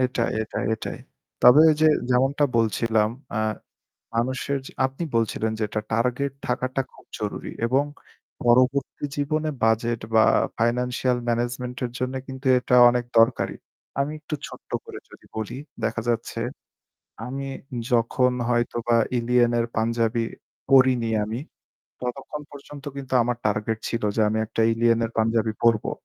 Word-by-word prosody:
এটাই, 125 -2 +1
এটাই, 110 - -4
এটাই। 110 - -6 0.4
তবে 125 +5 +9
ওই 155 - +5
যে - - +7 0.2
যেমনটা 135 +4 +3
বলছিলাম 110 -1 +2 0.2
অ্যা 110 - 0 0.8
মানুষের 130 +4 0
যে - - -10
আপনি 135 +6 -4
বলছিলেন, 110 -1 0
যে 110 - -1
এটা 105 - -2
টার্গেট 125 +4 0 0.2
থাকাটা 130 +2 0
খুব - - -18
জরুরী - - -4
এবং 130 +4 +3 0.6
পরবর্তী 130 +4 +2
জীবনে 155 +2 0
বাজেট 115 +1 +2 0.2
বা 110 - +7 0.3
ফাইন্যান্সিয়াল 125 +2 +1
ম্যানেজমেন্ট 120 +1 -2
এর 120 - -5
জন্য 130 +1 -2
কিন্তু 130 0 -9
এটা 125 - +1
অনেক 120 0 0
দরকারী। 115 -4 +3 0.4
আমি 140 +2 0
একটু 150 0 -5
ছোট্ট - - -13 0.2
করে - - -8
যদি - - -16
বলি, 110 +4 -4 0.3
দেখা 115 - -1
যাচ্ছে 115 0 -2 0.9
আমি 135 +2 -4 0.5
যখন 125 +2 +3 0.2
হয়তো 120 0 0
বা 115 - +5 0.2
'ILLIYEEN' 120 0 +3
এর 115 - 0
পাঞ্জাবি 115 +1 +1 0.5
পড়িনি 130 -4 +5
আমি 110 +2 -4 0.6
ততক্ষণ 135 +4 -5
পর্যন্ত 145 0 -11
কিন্তু 135 -1 -5
আমার 120 +1 -1
টার্গেট 105 +1 -1
ছিল 115 - -2
যে 110 - +2
আমি 110 +1 0
একটা 115 - -3
'ILLIYEEN' 115 0 +3
এর 115 - -4
পাঞ্জাবি 110 0 +2
পড়বো। 115 -2 +3
120 Hz, 145 wpm, -24 LUFS, 115-130 Hz, 0.9 s, তবে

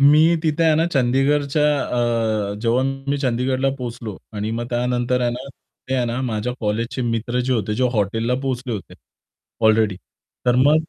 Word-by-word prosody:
मी 155 +4 +6
तिथे 160 +1 +1
आहे 160 -1 +5
ना 165 +2 +2
चंदीगडच्या 140 +3 +2 0.9
अ, - - -5
जेव्हा 120 +2 +2 0.3
मी 145 - +2
चंदीगडला 130 +1 0
पोहोचलो 115 -4 -6 0.2
आणि 105 0 -3
मग 120 +1 -3
त्यानंतर 125 +1 0
आहे 120 -1 +1
ना, 125 +3 -6 0.5
आहे 125 - +1
ना 120 +2 -2
माझ्या 115 0 -2
कॉलेजचे 115 +4 -1
मित्र 120 +1 -1
जे 130 +1 0
होते 105 -2 0
जे 130 +3 +1
हॉटेलला 115 +3 0
पोहोचले 130 -2 -3
होते 105 -6 -6 0.7
अलरेडी. 110 -3 +3 0.5
तर 125 - +4
मग 145 +4 +5
125 Hz, 160 wpm, -21 LUFS, 115-135 Hz, 0.9 s, मी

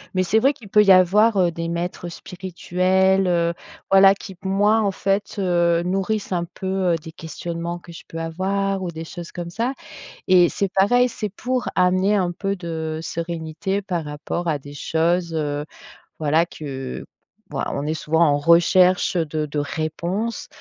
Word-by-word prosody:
mais 185 - +3
c'est 205 +5 +3
vrai 270 +5 +3
qu'il 220 -7 -15
peut 210 +1 +5
y 195 - +5
avoir, 200 +4 +5
heu, 180 -2 +3
des 165 0 -4
maîtres 175 +1 -4
spirituels, 185 +1 0
heu, 170 -1 +1 0.4
voilà 195 0 +7
qui 195 - -10
p 185 +1 -9
moi 205 +3 +3
en 205 - +1
fait, 195 +1 -1
heu, 175 -3 +2
nourrissent 195 +4 -1
un 175 -2 0
peu, 185 +1 -1
heu, - - +3
des 160 0 -8
questionnements 170 +2 -5
que 175 0 -13
je 165 - -11
peux 165 - -8
avoir 190 +4 -1
ou 180 - -3
des 165 -1 -7
choses 170 +1 -8
comme 170 -1 -6
ça, 235 +7 -1 0.6
et 180 -2 +6
c'est 200 - -1
pareil, 245 +6 +4
c'est 215 -3 -4
pour 250 +6 -3
amener 185 +3 +3
un 185 -4 +1
peu 195 +3 -2
de 160 -3 -4
sérénité 165 +3 -3
par 180 -4 -3
rapport 150 +4 -4
à 155 -3 0
des 145 +1 -11
choses, 170 +3 0
heu, 145 -2 -2 0.6
voilà 155 +2 +2
que 135 -6 -7 0.5
voi - - -2
on 140 - -3
est 155 - 0
souvent 160 +1 +1
en 145 -2 +2
recherche, 180 +4 +4
heu, 170 - +2
de 155 0 -2
de 150 0 -3
réponses, 170 +9 -3
175 Hz, 180 wpm, -22 LUFS, 165-195 Hz, 0.6 s, voilà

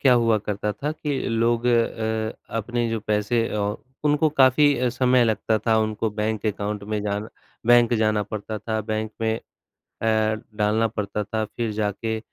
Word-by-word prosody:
क्या 130 -2 +5
हुआ 115 -1 +3
करता 105 0 -2
था 145 +3 -3
कि 150 -3 -3 0.2
लोग 120 +1 +2
अ, 110 -2 +1 0.2
अपने 120 +2 -1
जो 115 - -1
पैसे 105 +2 0
अ, 105 0 -1 0.3
उनको 150 +1 +3
काफ़ी 130 -1 +5
समय 125 0 +3
लगता 110 0 +1
था 110 -1 +4
उनको 110 0 0
बैंक 105 +1 -2
अकाउंट 105 0 -2
में 105 - 0
जाना 105 +1 -2 0.4
बैंक 120 0 +6
जाना 110 -1 +2
पड़ता 110 +1 -5
था, 110 +1 -2
बैंक 110 0 -3
में 110 0 +1 0.5
अ, 110 -1 0 0.3
डालना 110 +2 +2
पड़ता 105 0 -2
था 110 +1 -2
फ़िर 115 +1 -3
जाके 110 +1 -2
110 Hz, 160 wpm, -24 LUFS, 105-120 Hz, 0.5 s, बैंक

